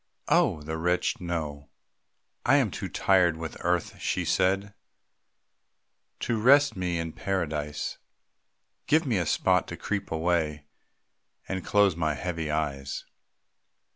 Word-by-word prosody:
(Oh, 75 Hz, -, +3 dB
the 80 Hz, +1 st, -4 dB
wretched 90 Hz, +2 st, 0 dB
know!) 75 Hz, -5 st, -4 dB, 0.7 s
"I -, -, +4 dB
am -, -, +3 dB
too -, -, -5 dB
tired 90 Hz, -4 st, +3 dB
with 80 Hz, -1 st, -6 dB
earth," 90 Hz, -1 st, 0 dB
she -, -, -1 dB
said, 95 Hz, +2 st, +1 dB, 1.5 s
"To 115 Hz, -2 st, -1 dB
rest 140 Hz, +4 st, +6 dB
me 90 Hz, -2 st, -1 dB
in 80 Hz, -1 st, -3 dB
Paradise. 75 Hz, -6 st, -3 dB, 0.9 s
Give 160 Hz, +2 st, +3 dB
me 115 Hz, -8 st, +1 dB
a 85 Hz, -, -1 dB
spot -, -, +2 dB
to -, -, -6 dB
creep 100 Hz, -2 st, -3 dB
away, 80 Hz, -3 st, 0 dB, 0.8 s
And 95 Hz, -1 st, -3 dB
close 100 Hz, -4 st, +3 dB
my 80 Hz, -2 st, 0 dB
heavy 80 Hz, +1 st, -3 dB
eyes. 70 Hz, -3 st, -2 dB
85 Hz, 125 wpm, -27 LUFS, 80-95 Hz, 1.5 s, rest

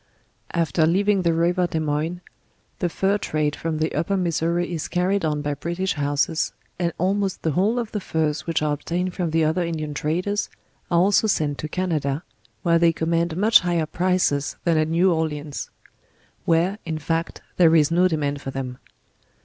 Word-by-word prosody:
After 160 Hz, -1 st, +2 dB
leaving 200 Hz, +3 st, +2 dB
the 170 Hz, -2 st, +2 dB
river 175 Hz, +2 st, +2 dB
Des 160 Hz, -, -2 dB
Moines, 155 Hz, +3 st, -2 dB, 0.6 s
the 175 Hz, -, 0 dB
Fur 195 Hz, +4 st, +1 dB
trade 150 Hz, -4 st, -1 dB
from 160 Hz, -1 st, -3 dB
the 155 Hz, +1 st, -1 dB
Upper 170 Hz, +6 st, 0 dB
Missouri 175 Hz, 0 st, 0 dB
is 160 Hz, -, -3 dB
carried 185 Hz, +2 st, 0 dB
on 150 Hz, -2 st, -1 dB
by 145 Hz, 0 st, -1 dB
British 170 Hz, +6 st, -2 dB
houses, 145 Hz, +2 st, 0 dB, 0.3 s
and 170 Hz, -1 st, +1 dB
almost 195 Hz, +2 st, 0 dB
the 160 Hz, -, +1 dB
whole 200 Hz, -, +1 dB
of 235 Hz, -3 st, -2 dB
the 210 Hz, -, -2 dB
Furs 160 Hz, -4 st, -1 dB
which 165 Hz, -2 st, 0 dB
are 150 Hz, -1 st, +1 dB
obtained 175 Hz, +5 st, -2 dB
from 175 Hz, -3 st, -2 dB
the 160 Hz, 0 st, +2 dB
other 160 Hz, +4 st, +1 dB
In 170 Hz, -1 st, -2 dB
dian 155 Hz, -1 st, -4 dB
traders, 180 Hz, +8 st, -1 dB, 0.4 s
are 170 Hz, -, +2 dB
also 200 Hz, +4 st, +4 dB
sent 150 Hz, -8 st, 0 dB
to 155 Hz, -, -4 dB
Canada, 155 Hz, -4 st, -1 dB, 0.4 s
where 170 Hz, -2 st, +4 dB
they 170 Hz, 0 st, +5 dB
command 165 Hz, +1 st, 0 dB
much 220 Hz, +4 st, +6 dB
higher 175 Hz, -3 st, 0 dB
prices 175 Hz, -4 st, 0 dB
than 170 Hz, -2 st, +2 dB
at 155 Hz, 0 st, +2 dB
New 170 Hz, +3 st, +3 dB
Orleans; 150 Hz, -2 st, -3 dB, 0.8 s
where, 175 Hz, +5 st, +2 dB
in 160 Hz, -2 st, -3 dB
fact, 165 Hz, +2 st, -3 dB
there 165 Hz, -2 st, +6 dB
is 155 Hz, -1 st, +4 dB
no 180 Hz, +2 st, +4 dB
demand 145 Hz, -4 st, -1 dB
for 135 Hz, -, -5 dB
them. 130 Hz, -2 st, -5 dB
165 Hz, 180 wpm, -23 LUFS, 155-180 Hz, 0.8 s, much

